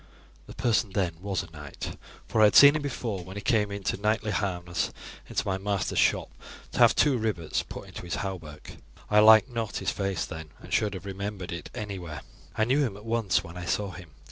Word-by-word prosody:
"The -, -, -10 dB
person 115 Hz, -4 st, +1 dB
then 90 Hz, -4 st, 0 dB
was 95 Hz, -2 st, -2 dB
a 95 Hz, -, -13 dB
knight, 75 Hz, -3 st, -7 dB, 0.3 s
for 110 Hz, -, +1 dB
I -, -, +9 dB
had 105 Hz, -, +4 dB
seen 140 Hz, +1 st, +9 dB
him 155 Hz, -, 0 dB
before 120 Hz, -9 st, -3 dB
when 95 Hz, +2 st, -10 dB
he -, -, -4 dB
came 105 Hz, -3 st, +2 dB
in 100 Hz, -1 st, -6 dB, 0.2 s
knightly 110 Hz, 0 st, +1 dB
harness 90 Hz, -4 st, -1 dB, 0.4 s
into -, -, -1 dB
my 95 Hz, -1 st, 0 dB
master's 100 Hz, -1 st, -1 dB
shop -, -, +2 dB, 0.4 s
to -, -, -5 dB
have -, -, +7 dB
two 135 Hz, -5 st, +3 dB
rivets 105 Hz, -8 st, -1 dB
put -, -, -9 dB
into -, -, -8 dB
his 85 Hz, -, -4 dB
hauberk. 80 Hz, -6 st, -7 dB, 0.3 s
I 105 Hz, -, +6 dB
liked 110 Hz, +3 st, +7 dB
not 115 Hz, -4 st, -3 dB
his -, -, -1 dB
face 100 Hz, -1 st, -2 dB
then, 80 Hz, -2 st, -8 dB
and -, -, -9 dB
should 105 Hz, -2 st, +1 dB
have 95 Hz, -, -8 dB
remembered 100 Hz, -1 st, -5 dB
it 85 Hz, -3 st, -6 dB
anywhere. 90 Hz, -7 st, -5 dB, 0.4 s
I 110 Hz, -, +3 dB
knew 130 Hz, +5 st, +2 dB
him 115 Hz, -8 st, -1 dB
at 105 Hz, -, -13 dB
once 115 Hz, -4 st, +1 dB
when 85 Hz, 0 st, -10 dB
I 90 Hz, -, -5 dB
saw 100 Hz, +2 st, -1 dB
him. 90 Hz, -2 st, -11 dB
100 Hz, 215 wpm, -27 LUFS, 90-110 Hz, 0.4 s, I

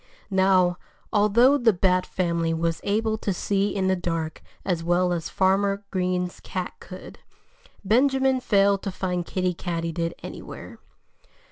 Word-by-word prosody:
Now, 185 Hz, -2 st, +3 dB, 0.3 s
although 235 Hz, +7 st, +4 dB
the 235 Hz, -3 st, +4 dB
Bat 185 Hz, 0 st, +1 dB
family 170 Hz, -2 st, -1 dB
was 165 Hz, 0 st, -1 dB
able 220 Hz, +1 st, 0 dB
to 205 Hz, -, -1 dB
see 200 Hz, +2 st, -1 dB
in 190 Hz, -1 st, 0 dB
the 190 Hz, -, +3 dB
dark 165 Hz, -3 st, -3 dB, 0.2 s
as 175 Hz, -3 st, -1 dB
well 175 Hz, +1 st, +2 dB
as 165 Hz, -2 st, -3 dB
Farmer 195 Hz, +1 st, +1 dB
Green's 180 Hz, -1 st, -1 dB
cat 185 Hz, -1 st, -5 dB
could, 185 Hz, -1 st, -11 dB, 0.7 s
Benjamin 265 Hz, +4 st, +3 dB
failed 200 Hz, -4 st, +3 dB
to 195 Hz, -, -4 dB
find 180 Hz, -1 st, -2 dB
Kiddie 185 Hz, -1 st, -1 dB
Katydid 165 Hz, -1 st, -3 dB
anywhere. -, -, -9 dB
185 Hz, 135 wpm, -25 LUFS, 175-200 Hz, 0.7 s, although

